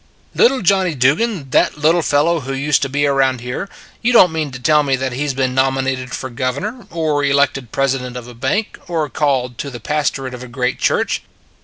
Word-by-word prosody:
" -, -, -36 dB
Little 260 Hz, -2 st, +3 dB
Johnny 185 Hz, -3 st, +2 dB
Dugan 145 Hz, -, +1 dB
that -, -, +2 dB
little 160 Hz, +3 st, +3 dB
fel 145 Hz, -1 st, +2 dB
low 170 Hz, +1 st, +1 dB
who 135 Hz, -1 st, -5 dB
used 140 Hz, +1 st, +1 dB
to 140 Hz, -, -1 dB
be 145 Hz, +2 st, +1 dB
around 135 Hz, -2 st, +2 dB
here 125 Hz, +10 st, -5 dB, 0.3 s
you 240 Hz, -, +2 dB
don 190 Hz, -7 st, +7 dB
t -, -, -10 dB
mean 155 Hz, -2 st, -2 dB
to 130 Hz, -, -8 dB
tell 150 Hz, +4 st, +4 dB
me 140 Hz, -2 st, +1 dB
that 130 Hz, 0 st, -3 dB
he 130 Hz, -, -4 dB
has 145 Hz, -3 st, -1 dB
been 130 Hz, -1 st, 0 dB
nominated 130 Hz, -1 st, 0 dB
for 130 Hz, -1 st, -5 dB
Governor; 145 Hz, -, -3 dB
or 155 Hz, -3 st, -1 dB
elected 140 Hz, -3 st, +1 dB
President 130 Hz, -2 st, -1 dB
of 120 Hz, -1 st, -8 dB
a 125 Hz, -, -10 dB
Bank 205 Hz, -, -2 dB
or 165 Hz, -3 st, -1 dB
called 130 Hz, -5 st, 0 dB
to 140 Hz, -, -4 dB
the 120 Hz, -3 st, -8 dB
Pastorate 135 Hz, 0 st, -2 dB
of 125 Hz, -, -8 dB
a -, -, -8 dB
great 125 Hz, +1 st, -2 dB
church. -, -, +1 dB
140 Hz, 220 wpm, -18 LUFS, 130-155 Hz, 0.3 s, don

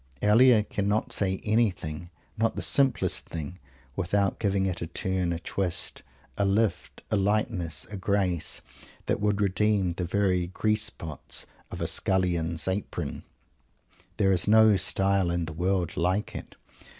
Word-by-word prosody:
Elia 110 Hz, +2 st, +6 dB
cannot 105 Hz, +1 st, -1 dB
say 95 Hz, -1 st, 0 dB
anything, 95 Hz, -7 st, 0 dB, 0.3 s
not 115 Hz, 0 st, 0 dB
the -, -, -3 dB
simplest 135 Hz, -1 st, +2 dB
thing, 85 Hz, +2 st, -6 dB, 0.4 s
without 95 Hz, +1 st, 0 dB
giving 100 Hz, -2 st, +1 dB
it 95 Hz, -2 st, -2 dB
a 85 Hz, -, -3 dB
turn, 90 Hz, +1 st, -2 dB
a 85 Hz, -, -1 dB
twist, 90 Hz, +1 st, -2 dB, 0.4 s
a -, -, +3 dB
lift, 100 Hz, +2 st, 0 dB
a -, -, +3 dB
lightness, 100 Hz, -5 st, 0 dB
a 105 Hz, -, -5 dB
grace, 95 Hz, -3 st, 0 dB, 0.4 s
that -, -, 0 dB
would 105 Hz, -1 st, +1 dB
redeem 100 Hz, -1 st, +1 dB
the 90 Hz, +1 st, -4 dB
very 90 Hz, -1 st, +1 dB
grease 110 Hz, +4 st, 0 dB
spots 80 Hz, -, -6 dB, 0.3 s
on -, -, -6 dB
a -, -, -1 dB
scullion's 85 Hz, -3 st, 0 dB
apron! 95 Hz, +2 st, -3 dB, 1.0 s
There 95 Hz, -1 st, +3 dB
is 95 Hz, +1 st, +2 dB
no 110 Hz, 0 st, +6 dB
style 95 Hz, -1 st, +2 dB
in 85 Hz, -1 st, -1 dB
the 80 Hz, -, -7 dB
world 90 Hz, +2 st, -1 dB
like 95 Hz, +4 st, 0 dB
it. -, -, -8 dB
95 Hz, 145 wpm, -27 LUFS, 90-105 Hz, 1.0 s, Elia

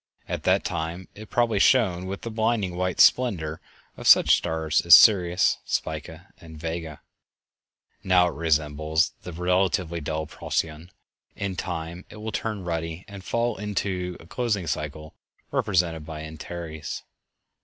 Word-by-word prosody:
At -, -, -3 dB
that -, -, +3 dB
time 85 Hz, +3 st, -4 dB
it 105 Hz, +1 st, -11 dB
probably 115 Hz, -4 st, +1 dB
shone 95 Hz, -7 st, +3 dB
with 100 Hz, +1 st, -5 dB
the 115 Hz, -, -5 dB
blinding 110 Hz, -4 st, 0 dB
white 90 Hz, 0 st, -2 dB
splendor 80 Hz, -11 st, +3 dB, 0.3 s
of -, -, -5 dB
such -, -, +7 dB
stars 80 Hz, -2 st, 0 dB
as 85 Hz, -, +10 dB
Sirius, 90 Hz, -3 st, +4 dB
Spica, 80 Hz, +4 st, -4 dB
and 80 Hz, -1 st, -12 dB
Vega; 80 Hz, -1 st, -5 dB, 1.0 s
now 90 Hz, -1 st, +4 dB
it 85 Hz, -, -3 dB
resembles 80 Hz, +2 st, +1 dB
the 90 Hz, -, -8 dB
relatively 90 Hz, -1 st, 0 dB
dull 80 Hz, +1 st, -3 dB
Procyon; 80 Hz, +2 st, -3 dB, 0.5 s
in 100 Hz, -2 st, -3 dB
time 85 Hz, 0 st, -5 dB
it -, -, -12 dB
will 110 Hz, +1 st, -6 dB
turn 105 Hz, -1 st, -3 dB
ruddy 85 Hz, +1 st, -4 dB
and 100 Hz, -2 st, -10 dB
fall 120 Hz, +4 st, -1 dB
into 95 Hz, -3 st, -3 dB
the -, -, -15 dB
closing 105 Hz, -1 st, -2 dB
cycle 75 Hz, +1 st, -4 dB, 0.4 s
represented 90 Hz, -, 0 dB
by 75 Hz, 0 st, -7 dB
Antares. 80 Hz, 0 st, -7 dB
85 Hz, 140 wpm, -25 LUFS, 80-100 Hz, 1.0 s, as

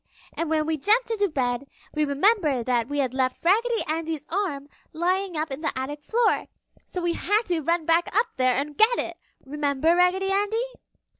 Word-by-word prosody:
"And 330 Hz, -1 st, -2 dB
when 310 Hz, -1 st, +1 dB
we 320 Hz, 0 st, -1 dB
jumped 445 Hz, -, +2 dB
into 410 Hz, -3 st, +1 dB
bed, 255 Hz, -3 st, -1 dB, 0.3 s
we 305 Hz, 0 st, +1 dB
remembered 290 Hz, -, +2 dB
that 245 Hz, -1 st, 0 dB
we 290 Hz, -, -2 dB
had 260 Hz, -3 st, 0 dB
left 260 Hz, +3 st, -1 dB
Raggedy 455 Hz, +5 st, +3 dB
Andy's 315 Hz, -1 st, -3 dB
arm 330 Hz, -7 st, -2 dB, 0.3 s
lying 360 Hz, +2 st, 0 dB
up 310 Hz, -1 st, -2 dB
on 270 Hz, +3 st, -5 dB
the 320 Hz, -, 0 dB
attic 285 Hz, +3 st, -4 dB
floor, 465 Hz, +5 st, +1 dB, 0.4 s
so 360 Hz, -, -4 dB
we 345 Hz, -1 st, +1 dB
had 415 Hz, +6 st, +1 dB
to 350 Hz, -6 st, -1 dB
run 335 Hz, +1 st, 0 dB
back 335 Hz, +2 st, +2 dB
up 445 Hz, +5 st, +3 dB
there 255 Hz, -2 st, +2 dB
and 290 Hz, +2 st, -3 dB
get 445 Hz, +8 st, +4 dB
it! -, -, -3 dB, 0.3 s
Remember, 290 Hz, +3 st, +1 dB
Raggedy 370 Hz, +2 st, +2 dB
Andy?" 415 Hz, +4 st, +1 dB
325 Hz, 190 wpm, -25 LUFS, 280-390 Hz, 0.4 s, get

